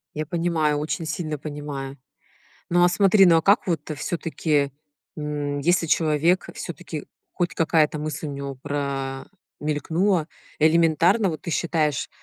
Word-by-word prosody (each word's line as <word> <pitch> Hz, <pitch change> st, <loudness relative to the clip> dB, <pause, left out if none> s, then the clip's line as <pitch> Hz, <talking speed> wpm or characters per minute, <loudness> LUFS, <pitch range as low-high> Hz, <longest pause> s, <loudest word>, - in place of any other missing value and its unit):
Я 155 Hz, -, -2 dB
понимаю, 165 Hz, -3 st, 0 dB
очень 155 Hz, +2 st, -3 dB
сильно 155 Hz, -2 st, -3 dB
понимаю. 145 Hz, -2 st, -6 dB, 0.7 s
Ну, 175 Hz, 0 st, +4 dB
а -, -, +6 dB
смотри, 195 Hz, +1 st, +5 dB
ну, 165 Hz, -1 st, +6 dB
а 160 Hz, -, +2 dB
как 200 Hz, +3 st, +4 dB
вот 165 Hz, -5 st, 0 dB, 0.2 s
всё-таки, 155 Hz, -4 st, -1 dB, 0.4 s
м, 145 Hz, -1 st, -3 dB
если 170 Hz, +3 st, +2 dB
человек, 160 Hz, +3 st, +2 dB
всё-таки -, -, -6 dB, 0.3 s
хоть 175 Hz, -1 st, -2 dB
какая-то 155 Hz, -2 st, +2 dB
мысль 155 Hz, 0 st, -4 dB
у -, -, -4 dB
него 140 Hz, 0 st, -5 dB
про 135 Hz, -1 st, -4 dB, 0.3 s
мелькнула, 160 Hz, +4 st, 0 dB, 0.3 s
элементарно, 165 Hz, +6 st, +4 dB
вот 155 Hz, -, -5 dB
ты 170 Hz, -, -4 dB
считаешь, 155 Hz, -4 st, 0 dB
155 Hz, 135 wpm, -24 LUFS, 145-170 Hz, 0.7 s, а